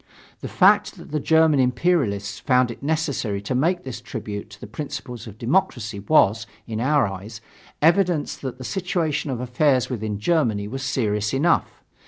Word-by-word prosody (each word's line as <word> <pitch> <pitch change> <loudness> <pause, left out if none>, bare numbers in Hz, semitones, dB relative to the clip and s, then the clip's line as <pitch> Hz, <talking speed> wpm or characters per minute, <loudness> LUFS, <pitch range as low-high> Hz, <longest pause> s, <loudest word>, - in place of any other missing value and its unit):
The - - -6
fact - - +3
that - - -12
the 150 - 0
German 160 0 +4
imperialists 125 - +1
found 125 -3 +2
it - - -11
necessary 140 -9 -1
to 100 - -3
make 170 +8 +1
this 125 -3 -7
tribute 105 -3 -6
to 105 -1 -14
the - - -8
principles 130 -1 -7
of 110 -1 -10
democracy, 120 - 0
was, 115 -2 +3 0.2
in 110 -1 -4
our 145 +3 +3
eyes, 100 +3 -7 0.4
evidence 170 -1 +3
that 130 -2 -6
the 130 - -8
situation 160 +1 -1
of 125 -3 -3
affairs 125 +1 +1
within 110 -3 -3
Germany 110 -5 +1
was 135 +5 -5
serious 110 -4 -1
enough.... 165 +5 +1
130 Hz, 165 wpm, -23 LUFS, 110-150 Hz, 0.4 s, German